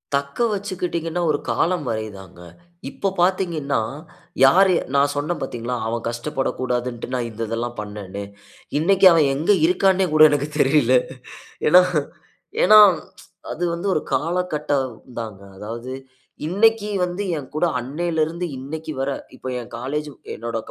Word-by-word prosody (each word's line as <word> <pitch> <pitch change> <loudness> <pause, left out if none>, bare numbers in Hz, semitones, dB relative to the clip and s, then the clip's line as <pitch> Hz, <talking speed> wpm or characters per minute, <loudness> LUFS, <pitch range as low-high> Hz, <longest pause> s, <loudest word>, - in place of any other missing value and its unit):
"தக்கவச்சுக்கிட்டீங்கன்னா, 175 +1 -2
ஒரு 145 - 0
காலம் 175 -3 0
வரை 110 -1 -2
தாங்க. 95 -2 -14 0.5
இப்ப 195 - -2
பார்த்தீங்கன்னா, 170 -9 +1 0.6
யாரு? 185 +7 +6 0.2
நான் 140 +1 +3
சொன்னேன், 150 +4 -2
பார்த்தீங்ளா? 125 -1 -4
அவன் 115 0 -3
கஷ்டப்படக்கூடாதுன்டு, 125 -1 -3
நான் 120 -1 -2
இந்த 110 - -8
இதெல்லாம் 120 +1 -3
பண்ணனேன்ன்னு." 100 -1 -7 0.6
இன்னைக்கி 195 +4 +3
அவன் 160 -4 +4
எங்கு 165 +9 +3
இருக்கான்னே 190 +1 +3
கூட 155 0 +7
எனக்கு 145 0 0
தெரியல. 135 -3 +4 0.7
ஏன்னா, 180 +3 +8 0.8
ஏன்னா, 215 +3 +8 0.7
அது 175 - -4
வந்து 175 +4 -3
ஒரு 155 - +1
காலகட்டம் 150 -3 0 0.3
தாங்க. 110 -4 -7 0.2
அதாவது 115 +5 -7 0.6
இன்னைக்கி 210 +4 +3
வந்து 180 +3 -2
என் 140 - -8
கூட 165 +3 +2
அன்னையிலுருந்து 160 +5 -2
இன்னைக்கி 155 +4 -6
வர 135 +1 -1 0.3
இப்ப - - -9
என் 120 - -10
காலேஜ், 150 +5 -3 0.3
என்னோட 115 0 -4
150 Hz, 125 wpm, -22 LUFS, 120-175 Hz, 0.8 s, ஏன்னா